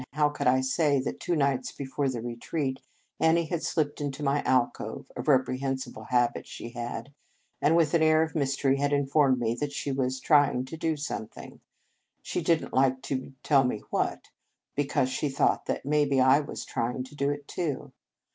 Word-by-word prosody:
How 150 0 +3
could 145 - -2
I 130 +1 +4
say 140 +2 +2
that - - -4
two 175 - -1
nights 140 -4 +1
before 140 0 -2
the 120 -3 -4
retreat, 130 +3 -3 0.4
Annie 165 +1 +3
had 165 0 -2
slipped 150 -3 -1
into 145 0 -4
my 140 +1 +2
alcove, 130 -2 0
a - - -3
reprehensible 130 -4 0
habit 120 0 +1
she 115 - -8
had, 120 +2 -6 0.5
and, 160 - +4
with 165 -2 +3
an 165 - +4
air 155 0 +5
of 160 - -4
mystery, 135 -2 +1
had 145 +1 0
informed 140 -1 +3
me 115 -1 0
she 140 0 -4
was 130 -1 -1
"trying 145 -3 +3
to 130 - -7
do 160 -1 -1
something," 140 -7 -6 0.6
she - - -2
didn 165 -1 +1
t - - -6
like 130 0 +2
to 135 0 -4
tell 140 -3 +4
me 125 -4 -2
what, - - -2 0.4
because 140 -2 +1
she 145 +3 -1
thought 135 - +1
that - - -2
maybe 145 -2 +2
I 130 +2 +6
was 145 - -6
trying 125 +2 -2
to 130 - -13
do 140 -1 0
it, 145 0 -4
too. 155 -7 -3
140 Hz, 185 wpm, -28 LUFS, 130-150 Hz, 0.6 s, I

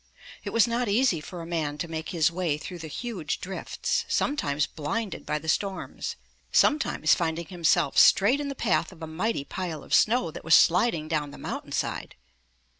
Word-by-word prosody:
It - - -4
was 230 - +4
not 235 -1 -1
easy 205 -6 +2
for 175 +1 -8
a - - -7
man 160 -4 -2
to 170 - -3
make 160 -1 -5
his 165 -3 +2
way 170 -4 -1
through 175 +3 -8
the 160 - -7
huge 180 - -4
drifts, 195 - -2
sometimes 150 - 0
blinded 185 +8 -4
by 150 - 0
the 160 - -9
storms, 195 +4 -2 0.4
sometimes 290 - +3
finding 170 0 -1
him 175 0 -11
self 160 -3 +3
straight 230 +8 +6
in 290 - -3
the 275 - -4
path 170 -9 0
of 170 -3 -12
a - - -2
mighty 160 +2 -2
pile 170 0 -5
of - - -7
snow 220 -7 +3
that - - -9
was 160 - +6
sliding 170 -3 +3
down 155 -2 -1
the - - -11
mountain - - -6
side. - - -3
170 Hz, 190 wpm, -27 LUFS, 155-215 Hz, 0.4 s, straight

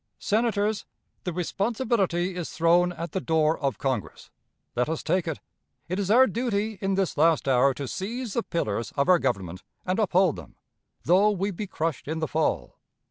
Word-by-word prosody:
Senators, 215 -1 0 0.4
the 180 - -1
responsibility 190 0 0
is 175 -3 -4
thrown 170 +2 +3
at 170 -1 -6
the 190 - -2
door 160 -1 +2
of 135 -7 -1
Congress. 120 - -3 0.4
Let 125 +3 +1
us 160 - -3
take 175 +1 0
it. 160 - -3 0.5
It 185 +4 -2
is 200 -1 -1
our 250 +5 +7
duty 220 -2 -2
in 195 0 0
this 195 -2 -1
last 160 -1 +3
hour 135 +1 +4
to 140 -1 -5
seize 225 - -4
the 235 - +1
pillars 115 - -2
of 140 - +2
our 180 -1 +6
Government 95 - -2 0.2
and 185 +3 0
uphold 185 -5 +3
them, - - -11 0.5
though 190 +5 +5
we 200 0 -1
be 200 +3 -5
crushed 160 -5 -3
in 160 +2 -2
the 160 -1 -1
fall. 150 - -1
180 Hz, 180 wpm, -26 LUFS, 155-200 Hz, 0.5 s, our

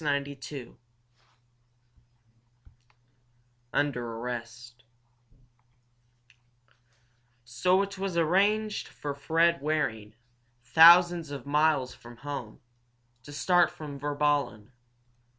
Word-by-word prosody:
CHAPTER 140 -1 -1 0.2
II 125 -4 -10 2.9
UNDER 140 -4 -1
ARREST 120 0 -8 2.6
So 130 +11 +1
it 200 -1 -7
was 190 -3 -3
arranged 205 +6 +1
for 145 -1 -6
Fred 165 +3 +1
Waring, 110 -9 -2 0.5
thousands 170 +3 +6
of 140 -3 -8
miles 150 -3 +1
from 120 0 -14
home, 140 -5 -7 0.6
to 145 - -13
start 175 +3 +2
from 145 -3 -9
Virballen. 145 -6 -1
145 Hz, 80 wpm, -28 LUFS, 125-170 Hz, 2.9 s, thousands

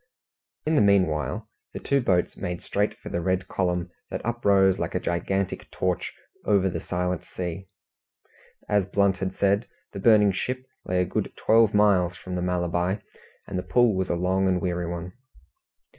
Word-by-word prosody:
In 155 - +1
the 150 - +4
meanwhile 90 -7 +2 0.3
the - - -5
two 140 0 +1
boats 90 -7 +1
made 90 0 -5
straight 105 +1 -1
for - - -9
the 85 - -2
red 95 +1 0
column 90 -2 -1 0.2
that - - -5
uprose 100 -5 +3
like - - -3
a - - +2
gigantic 95 +2 -2
torch 90 -1 -2 0.3
over 100 -2 +3
the - - -3
silent 90 -1 -2
sea. 90 +1 -6 1.0
As 100 -3 +2
Blunt 100 -1 +2
had 95 0 -3
said, 100 +4 +2 0.3
the 100 - -5
burning 105 -1 +5
ship 125 +7 -3 0.2
lay 90 0 +1
a - - +1
good - - -2
twelve 110 -1 +4
miles 95 -4 +4
from 95 -3 -8
the 90 - -1
Malabar, 90 +2 0 0.5
and 95 - -3
the - - -1
pull 120 +1 +3
was 95 -1 -1
a - - +1
long 95 +2 +1
and 95 -1 +2
a - - -2
weary 90 -1 -2
one. 85 +1 -5
95 Hz, 175 wpm, -25 LUFS, 90-100 Hz, 1.0 s, burning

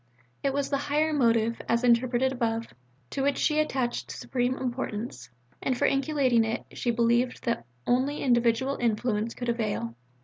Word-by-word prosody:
It 275 - +1
was 280 0 -1
the 280 - +2
higher 305 +2 +1
motive 230 -4 +2
(as 235 +1 +2
interpreted 245 +2 +3
above) 230 -3 -2 0.4
to 275 - -2
which 280 +1 +1
she 305 -1 +2
attached 260 -5 -1
supreme 255 0 -1
importance, 230 - -4 0.3
and 260 -2 0
for - - +2
inculcating 275 -4 +2
it 225 +1 -3
she 245 - -2
believed 235 +1 +2
that 235 - -2 0.2
only 265 +4 +1
individual 240 +1 +2
influence 225 -1 0
could 245 - -5
avail. 215 - -1
245 Hz, 150 wpm, -27 LUFS, 230-270 Hz, 0.4 s, interpreted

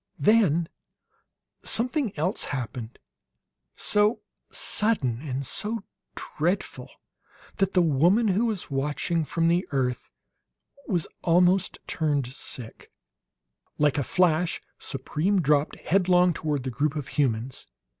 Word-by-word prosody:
Then 190 -7 +3 1.0
something 250 +1 +2
else 180 +7 0
happened 125 -3 -5 0.8
so 210 +2 +2 0.3
sudden 155 - +1
and 140 -2 -4
so 215 - -1 0.3
dreadful 180 +5 -3 0.7
that 195 -1 +1
the 180 - +4
woman 175 - +3
who 210 +5 +2
was 205 -9 -4
watching 150 +4 -1
from 165 +2 0
the 175 +2 +1
earth 130 -3 -2 0.8
was 175 -7 0
turned - - -19
almost 180 +2 +3 0.6
sick. 115 -3 -7 0.9
Like 150 -1 +2
a - - 0
flash 175 +1 +1 0.2
Supreme 155 +8 -1
dropped, 150 -2 +2
headlong, 180 -1 +3
toward 150 -4 -2
the 130 - -3
group 145 +5 -1
of 145 -2 -5
humans. 125 -3 -1
165 Hz, 110 wpm, -26 LUFS, 140-190 Hz, 1.0 s, the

